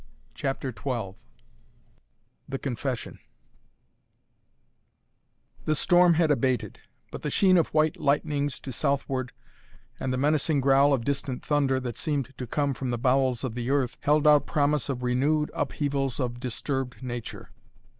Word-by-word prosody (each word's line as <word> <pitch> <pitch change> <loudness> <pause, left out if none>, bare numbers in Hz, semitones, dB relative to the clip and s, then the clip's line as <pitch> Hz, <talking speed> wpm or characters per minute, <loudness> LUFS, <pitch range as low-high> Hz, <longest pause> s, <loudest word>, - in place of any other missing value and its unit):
CHAPTER 135 -1 -3
XII 115 -4 -3 1.4
THE 135 - -2
CONFESSION 130 -2 -4 2.5
The 155 - +2
storm 175 0 +4
had 160 -2 +3
abated, 130 -3 0 0.3
but - - -7
the - - -2
sheen 190 -2 +4
of 170 - +4
white 155 0 +1
lightnings 145 0 0
to 135 - -6
southward 135 -2 -1 0.7
and 130 - -2
the 130 - -1
menacing 150 +2 +2
growl 135 +1 +4
of 125 -4 +1
distant 140 -2 -2
thunder 140 -3 +1
that 120 -3 -5
seemed 140 -3 -2
to 125 - -4
come 140 +3 0
from 130 0 -4
the 120 - -1
bowels 130 0 +1
of 130 -4 -3
the 120 +1 -4
earth 135 -3 0
held 150 +1 +2
out 150 -2 +5
promise 150 -3 +1
of 125 -2 -3
renewed 145 +5 +1
upheavals 140 -3 -1
of 120 -2 -2
disturbed 130 +1 -4
nature. 120 -2 -6
135 Hz, 140 wpm, -27 LUFS, 125-145 Hz, 2.5 s, out